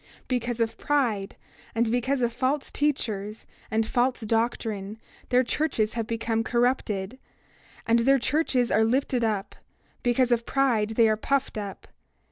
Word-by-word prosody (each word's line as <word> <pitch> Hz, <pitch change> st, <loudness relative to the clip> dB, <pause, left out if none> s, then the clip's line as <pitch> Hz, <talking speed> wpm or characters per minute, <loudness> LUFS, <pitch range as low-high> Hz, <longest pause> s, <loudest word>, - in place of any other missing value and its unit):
28:12 -, -, -33 dB
Because 245 Hz, -2 st, -1 dB
of 225 Hz, -1 st, 0 dB
pride, 235 Hz, -9 st, 0 dB, 0.4 s
and 225 Hz, 0 st, +1 dB
because 255 Hz, +3 st, 0 dB
of 240 Hz, -1 st, +1 dB
false 270 Hz, +3 st, -1 dB
teachers, 220 Hz, -8 st, -2 dB, 0.2 s
and 220 Hz, 0 st, +1 dB
false 245 Hz, +2 st, +1 dB
doctrine, 220 Hz, -2 st, -1 dB, 0.3 s
their 255 Hz, 0 st, +4 dB
churches 230 Hz, -4 st, 0 dB
have 230 Hz, -2 st, -3 dB
become 225 Hz, -1 st, -1 dB
corrupted, 235 Hz, -2 st, 0 dB, 0.7 s
and 230 Hz, +1 st, +4 dB
their 270 Hz, +4 st, +4 dB
churches 260 Hz, -2 st, +1 dB
are 220 Hz, -, +4 dB
lifted 250 Hz, +1 st, +1 dB
up; 210 Hz, -3 st, -1 dB, 0.5 s
because 245 Hz, 0 st, +2 dB
of 235 Hz, -1 st, +2 dB
pride 230 Hz, -5 st, +1 dB
they 230 Hz, -1 st, +5 dB
are 215 Hz, -, +3 dB
puffed 275 Hz, +4 st, 0 dB
up. 205 Hz, -2 st, -6 dB
235 Hz, 145 wpm, -26 LUFS, 220-255 Hz, 0.7 s, they